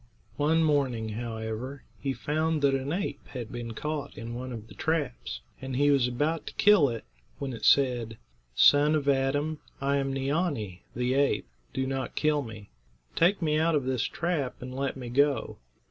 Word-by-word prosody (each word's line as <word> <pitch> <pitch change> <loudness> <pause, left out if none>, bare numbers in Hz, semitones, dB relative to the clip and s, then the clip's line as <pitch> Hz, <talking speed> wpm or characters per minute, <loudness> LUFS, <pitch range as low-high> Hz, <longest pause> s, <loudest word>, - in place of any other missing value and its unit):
One 160 +3 +3
morning, 135 -7 +1
however, 115 +4 -5 0.2
he 135 - -1
found 155 +2 -1
that 140 -1 +5
an 135 +1 -1
ape 175 -5 -3
had 120 -4 -6
been 120 -1 -5
caught 150 +2 -4
in 115 +1 -6
one 125 +2 -5
of 110 -2 -7
the 105 - -13
traps, 145 - -2 0.2
and 130 -1 -4
he 145 +2 +4
was 135 -3 +4
about 150 +6 -1
to - - -7
kill 205 -9 +6
it, 115 -2 -5 0.3
when 135 -2 -4
it 115 - -8
said: 120 -5 +3 0.4
"Son 145 - +6
of 145 -2 -1
Adam, 145 +3 +1 0.2
I 140 +1 +1
am 135 -1 0
Neea'nee, 135 - -1
the 125 +1 +1
ape; 140 +1 +2 0.2
do 130 - -1
not 135 -1 -3
kill 150 -1 +2
me. 110 -5 -9 0.4
Take 180 +2 +3
me 155 -1 +2
out 165 0 +3
of 145 - +1
this 130 -3 0
trap 160 -7 -2
and 125 0 -7
let 135 +1 -2
me 125 -2 -6
go. 140 - +1
135 Hz, 180 wpm, -28 LUFS, 125-150 Hz, 0.4 s, kill